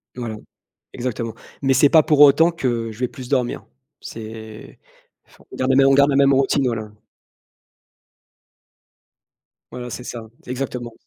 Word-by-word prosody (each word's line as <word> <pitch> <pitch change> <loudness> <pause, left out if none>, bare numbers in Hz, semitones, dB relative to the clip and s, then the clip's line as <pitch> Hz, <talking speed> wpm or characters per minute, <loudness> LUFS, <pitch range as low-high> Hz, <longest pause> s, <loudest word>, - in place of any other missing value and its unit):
Voilà 120 -3 -5 0.6
exactement 115 -2 -4 0.3
mais 135 -1 +2
c'est 140 +3 +5
pas 160 - +6
pour 150 -1 +1
autant 150 +4 +7
que 120 -8 -2
je 110 - -14
vais 125 - -1
plus 125 0 -10
dormir. 125 -3 -1 0.4
C'est 110 -1 -10 0.5
enfin, - - -23
on - - -10
garde 130 +1 -1
les 130 - +3
mêmes 135 - +5
on 135 - +4
garde 140 +1 +4
la 135 - +1
même 140 0 +4
routine, 135 +1 +1
voilà. 110 -3 -3 2.8
Voilà, 125 0 -7
c'est 125 - -7
ça 120 -2 -7 0.2
exactement. 125 -2 -5
125 Hz, 150 wpm, -21 LUFS, 115-135 Hz, 2.8 s, autant